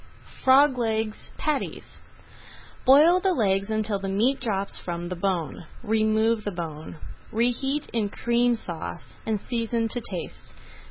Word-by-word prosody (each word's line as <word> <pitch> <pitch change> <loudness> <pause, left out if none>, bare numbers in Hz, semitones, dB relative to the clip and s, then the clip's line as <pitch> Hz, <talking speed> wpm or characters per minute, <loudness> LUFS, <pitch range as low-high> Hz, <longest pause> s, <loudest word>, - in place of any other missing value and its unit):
FROG 265 0 +6
LEGS 220 -2 -2
PATTIES 305 -3 -3 0.9
Boil 305 +7 +7
the 380 0 +2
legs 195 -4 +1
until 215 -2 -1
the 195 0 -4
meat 230 +8 +2
drops 200 -5 -2
from 175 0 -5
the 180 - -3
bone, 175 -3 -2 0.2
remove 220 +1 +2
the 205 - -2
bone, 165 -5 -6 0.4
reheat 245 +5 0
in 220 -3 0
Cream 240 +3 +2
Sauce, 170 -7 -7
and 220 -2 0
season 230 0 -1
to 245 - -3
taste. 180 -3 -7
220 Hz, 130 wpm, -26 LUFS, 195-245 Hz, 0.9 s, Boil